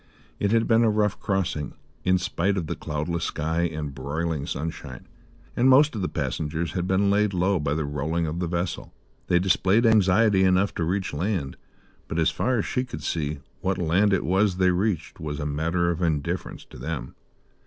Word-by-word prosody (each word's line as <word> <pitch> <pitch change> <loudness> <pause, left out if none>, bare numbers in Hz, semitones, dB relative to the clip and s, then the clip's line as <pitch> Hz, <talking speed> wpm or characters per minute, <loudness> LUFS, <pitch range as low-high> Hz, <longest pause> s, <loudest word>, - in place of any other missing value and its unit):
It 100 - +1
had 115 0 +3
been 115 0 +4
a 115 - +4
rough 105 -2 +1
crossing, 95 -6 -2 0.3
in 95 0 +3
spite 95 +1 -1
of 90 - -1
the - - -3
cloudless 80 +3 -3
sky 80 +3 -1
and 75 -3 -5
broiling 70 +2 -3
sunshine, 70 -4 -6 0.5
and 125 +2 +4
most 145 +3 +6
of 110 - -3
the 90 - -1
passengers 80 +2 -2
had 90 -1 -2
been 100 +1 +2
laid 105 -1 +2
low 90 +1 +2
by 75 -1 -1
the 80 -1 -1
rolling 75 +4 -1
of 80 +2 -3
the 90 - -1
vessel. 85 +1 -3 0.3
They 90 - +3
displayed 95 +5 +3
anxiety 105 -2 +4
enough 95 +2 +3
to 85 - -2
reach 95 +2 -1
land; 85 -3 -2 0.5
but, 80 - -4
as 80 -1 +3
far 130 0 0
as 105 - 0
she 125 - -1
could 75 - -8
see, 75 -2 -2 0.2
what 95 0 -1
land 90 +4 +2
it 95 - +1
was 95 +1 +2
they 95 -1 +4
reached 95 -1 -1
was 75 -1 -4
a 75 - -3
matter 85 +4 0
of 85 +1 -4
indifference 80 -4 -2
to - - -11
them. - - -5
90 Hz, 195 wpm, -25 LUFS, 80-100 Hz, 0.5 s, most